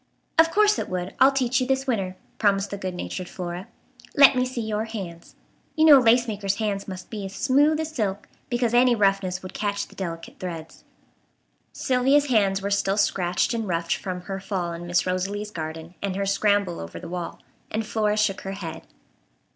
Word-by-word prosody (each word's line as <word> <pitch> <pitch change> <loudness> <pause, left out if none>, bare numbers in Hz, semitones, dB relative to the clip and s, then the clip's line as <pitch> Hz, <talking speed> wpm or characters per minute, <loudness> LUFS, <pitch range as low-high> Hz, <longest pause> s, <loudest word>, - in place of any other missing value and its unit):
"Of 325 0 +7
course 420 +3 +3
it - - -4
would. 180 0 -3
I'll 270 - +7
teach 260 -1 +1
you 255 - 0
this 265 0 +1
winter," 195 -8 -1 0.2
promised 200 -2 +2
the 200 - -3
good 185 -2 -4
natured 180 0 -5
Flora; 180 0 -6 0.5
"let 280 -1 +8
me 255 0 +1
see 255 -2 -4
your 215 0 -2
hands. 190 -7 -8 0.4
You 315 - +4
know 295 -3 +9
a - - +2
lace 240 +1 +4
maker's 200 -2 -1
hands 205 -2 -2
must 185 -2 -8
be 210 -3 -5
as 195 0 -7
smooth 290 +3 +3
as 315 0 -3
silk, 205 -6 -2 0.2
because 240 -1 0
any 245 0 +5
roughness 195 -3 +1
would 185 - -8
catch 205 -1 -2
the - - -17
delicate 165 -3 -6
threads." 165 -3 -7 0.9
Sylvia's 270 +3 +2
hands 200 -5 +2
were 200 - -2
still 200 0 +1
scratched 185 -1 +1
and 225 -2 -2
roughed 170 -1 0
from 185 -2 -5
her 195 +1 -5
fall 185 -3 -3
in 170 +1 -7
Miss 175 0 +2
Rosalie's 195 +3 -2
garden 160 -1 -6
and 195 -2 -2
her 200 0 -1
scramble 200 -2 +1
over 85 0 -7
the 170 - -8
wall, 175 0 -5 0.3
and 220 +1 -2
Flora 215 -1 0
shook 210 -2 +1
her 195 - -5
head. 165 -5 -7
200 Hz, 195 wpm, -25 LUFS, 185-235 Hz, 0.9 s, know